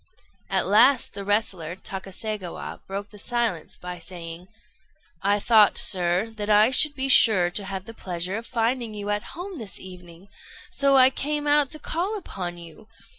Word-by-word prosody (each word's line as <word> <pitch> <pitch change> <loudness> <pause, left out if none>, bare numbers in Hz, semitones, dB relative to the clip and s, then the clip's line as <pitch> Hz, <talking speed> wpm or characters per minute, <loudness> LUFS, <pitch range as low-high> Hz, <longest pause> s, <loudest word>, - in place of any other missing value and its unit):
At - - +1
last 235 +6 +4
the 200 - -6
wrestler, 195 -5 -1
Takaségawa, 195 0 -6
broke 200 +1 -6
the 210 - -12
silence 230 -8 -2
by 180 0 -7
saying 170 0 -9 0.7
"I 205 +1 +2
thought, 215 -1 +5
sir, 180 +4 +2
that 210 0 -4
I 215 +3 +6
should 290 +3 +5
be 270 0 -2
sure 195 -9 +5
to 200 +2 -2
have 190 -1 -5
the 230 - -10
pleasure 180 -2 -4
of 230 +1 -8
finding 235 -1 -1
you 205 0 -4
at 205 +9 -4
home 360 -2 -7
this 215 -4 -7
evening, 180 0 -13 0.4
so 275 -1 +3
I 260 0 +7
came 295 +2 -3
out 290 -1 +3
to - - -2
call 370 +9 -2
upon 180 - -6
you. 170 +5 -13
205 Hz, 170 wpm, -24 LUFS, 180-245 Hz, 0.7 s, I